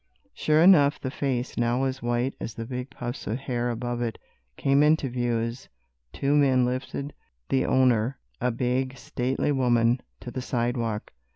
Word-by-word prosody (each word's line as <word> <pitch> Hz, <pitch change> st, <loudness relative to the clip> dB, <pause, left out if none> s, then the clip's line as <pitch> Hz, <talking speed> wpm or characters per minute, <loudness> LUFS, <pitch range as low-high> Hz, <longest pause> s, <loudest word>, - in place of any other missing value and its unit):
Sure 155 Hz, +1 st, +3 dB
enough, 150 Hz, -6 st, +6 dB
the 130 Hz, -, -4 dB
face, 130 Hz, -4 st, -2 dB
now 120 Hz, +2 st, +1 dB
as 135 Hz, 0 st, -2 dB
white 120 Hz, +2 st, 0 dB
as 110 Hz, -, -5 dB
the 115 Hz, -, -5 dB
big 125 Hz, +2 st, -5 dB
puffs 120 Hz, -1 st, -6 dB
of 110 Hz, -, -1 dB
hair 125 Hz, -3 st, -2 dB
above 120 Hz, +1 st, -3 dB
it, 115 Hz, -2 st, -2 dB, 0.4 s
came 140 Hz, +1 st, +3 dB
into 150 Hz, -1 st, +3 dB
view 120 Hz, -1 st, 0 dB
as 115 Hz, +3 st, -4 dB, 0.4 s
two 140 Hz, -, 0 dB
men 130 Hz, -3 st, +4 dB
lifted 130 Hz, +3 st, -3 dB, 0.4 s
the 135 Hz, -, +2 dB
owner, 125 Hz, -1 st, +3 dB, 0.2 s
a 125 Hz, -, +2 dB
big, 130 Hz, +2 st, -1 dB
stately 130 Hz, +4 st, -1 dB
woman, 120 Hz, -2 st, +2 dB, 0.2 s
to 120 Hz, -, -8 dB
the 130 Hz, -, -4 dB
sidewalk. 120 Hz, -, -2 dB
125 Hz, 165 wpm, -26 LUFS, 120-135 Hz, 0.4 s, enough